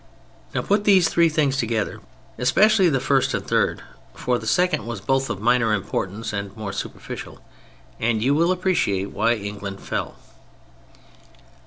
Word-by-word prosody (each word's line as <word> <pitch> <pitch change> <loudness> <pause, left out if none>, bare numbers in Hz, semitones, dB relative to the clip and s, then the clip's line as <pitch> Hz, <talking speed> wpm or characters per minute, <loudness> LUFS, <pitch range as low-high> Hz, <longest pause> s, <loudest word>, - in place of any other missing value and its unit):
Now - - 0
put 205 +1 +1
these 185 -5 +5
three 170 -1 +3
things 145 -3 +1
together, 115 -4 -1 0.4
especially 195 - +4
the 135 -4 +1
first 135 0 +1
and - - -4
third - - 0 0.3
(for 125 -1 -1
the 110 - -8
second 175 0 +1
was 115 -3 -4
both 135 +6 0
of 95 - -3
minor 115 0 +3
importance 100 +2 -4
and 100 +1 -5
more 105 -3 -5
superficial), - - -7 0.6
and 110 0 +1
you 135 +3 +3
will 170 +4 +3
appreciate 175 - 0
why 120 - +2
England 100 -2 -6
fell. - - -4
125 Hz, 150 wpm, -23 LUFS, 105-165 Hz, 0.6 s, these